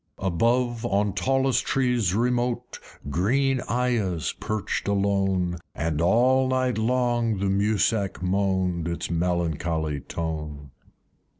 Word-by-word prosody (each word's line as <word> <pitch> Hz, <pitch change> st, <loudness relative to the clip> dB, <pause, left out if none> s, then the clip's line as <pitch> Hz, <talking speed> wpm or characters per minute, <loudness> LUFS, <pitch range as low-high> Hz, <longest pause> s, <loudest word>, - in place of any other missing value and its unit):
Above, 115 Hz, +6 st, 0 dB
on 100 Hz, 0 st, +1 dB
tallest 130 Hz, +6 st, +1 dB
trees 125 Hz, -8 st, +1 dB
remote 120 Hz, +1 st, -1 dB, 0.3 s
Green 130 Hz, -, +1 dB
Ayahs 115 Hz, -9 st, 0 dB
perched 110 Hz, -2 st, -3 dB
alone, 95 Hz, -3 st, +1 dB, 0.2 s
And 80 Hz, 0 st, -1 dB
all 125 Hz, +8 st, +4 dB
night 130 Hz, -2 st, 0 dB
long 120 Hz, -1 st, +1 dB
the 100 Hz, -, -2 dB
Mussak 100 Hz, 0 st, +1 dB
moan'd 95 Hz, -2 st, 0 dB
Its 85 Hz, 0 st, -3 dB
melancholy 80 Hz, -3 st, -1 dB
tone. 75 Hz, -3 st, -5 dB
100 Hz, 100 wpm, -25 LUFS, 85-120 Hz, 0.3 s, all